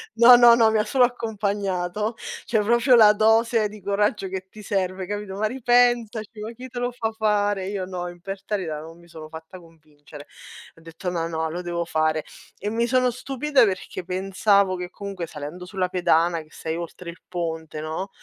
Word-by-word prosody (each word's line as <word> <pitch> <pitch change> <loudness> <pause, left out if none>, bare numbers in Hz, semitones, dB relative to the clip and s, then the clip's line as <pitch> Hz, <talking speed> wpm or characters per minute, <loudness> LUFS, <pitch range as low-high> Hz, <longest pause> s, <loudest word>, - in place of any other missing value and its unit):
no, 235 +2 +9
no, 240 -1 +8
no, 225 -2 +4
mi 220 - +2
ha - - +2
solo 255 +1 +2
accompagnato. 205 -3 -2 0.3
Cioè 220 -2 +1
proprio 235 +4 +4
la 210 -2 +8
dose 225 0 +3
di 210 -1 -12
coraggio 200 0 0
che 190 0 -5
ti 215 -1 -12
serve, 190 -1 -2
capito: 205 -1 -5
"Ma 215 +2 -1
ripensaci, 240 -3 +1
ma 220 +2 -5
chi 255 +2 -9
te 245 0 -6
lo 245 0 -1
fa 225 -2 -3
fare?" 205 -3 0
Io 195 -2 -3
no, 180 -1 -5
imperterrita 185 -2 -5
non 165 +2 -12
mi 170 - -18
sono 160 -2 -11
fatta 160 +3 -10
convincere. 150 -3 -15 0.5
Ho - - -17
detto: 165 +3 -6
"No, 165 -1 -2
no, 160 -1 -2
lo 175 +2 -4
devo 170 -1 -3
fare." 155 -1 0 0.3
E 205 - -3
mi 235 +1 0
sono 255 0 +2
stupita 270 +2 +1
perché 185 -2 -2
pensavo 190 +1 +1
che 180 0 -5
comunque, 195 -4 -6
salendo 155 +5 -8
sulla 185 -1 -2
pedana 170 -2 +2
che 155 - -18
sei 160 0 -5
oltre 170 +1 -7
il 175 - -18
ponte, 160 -3 -4
no, 160 +5 -4
195 Hz, 190 wpm, -24 LUFS, 170-220 Hz, 0.5 s, no